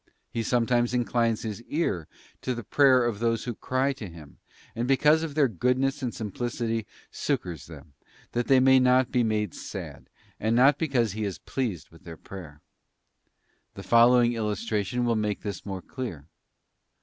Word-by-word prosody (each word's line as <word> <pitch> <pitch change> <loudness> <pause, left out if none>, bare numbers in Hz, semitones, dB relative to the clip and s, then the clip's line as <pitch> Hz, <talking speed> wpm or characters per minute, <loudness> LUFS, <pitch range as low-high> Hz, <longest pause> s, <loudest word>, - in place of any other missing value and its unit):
He 115 - -2
sometimes 120 +1 +1
inclines 120 -2 +1
His 110 -1 -5
ear 115 - -2 0.3
to 130 - -2
the 120 - -6
prayer 130 +1 +4
of 115 -4 -2
those 115 -1 0
who 120 - -3
cry 130 +5 0
to 115 -8 -8
Him, 80 -4 -14 0.4
and 120 +2 -2
because 150 +4 +4
of 160 -3 -5
their 150 -3 +4
goodness 125 - 0
and 125 -3 -2
simplicity 115 0 -3 0.2
succours 85 -6 -3
them, 75 -2 -13 0.4
that 120 0 -1
they 135 -1 +6
may 130 0 +6
not 125 0 +3
be 125 - +2
made 105 -5 0
sad, - - -8 0.3
and 110 +2 +1
not 135 +4 +5
because 130 -9 +1
He 110 +2 -4
is 100 -3 -3
pleased 115 - -4
with 80 - -18
their 85 -2 -9
prayer. 80 -7 -11 1.1
The - - -8
following 120 0 +5
illustration 110 +1 -1
will 120 -1 +2
make 105 -2 -1
this 100 -2 -5
more 95 -2 -5
clear. 110 - -6
115 Hz, 165 wpm, -27 LUFS, 105-130 Hz, 1.1 s, they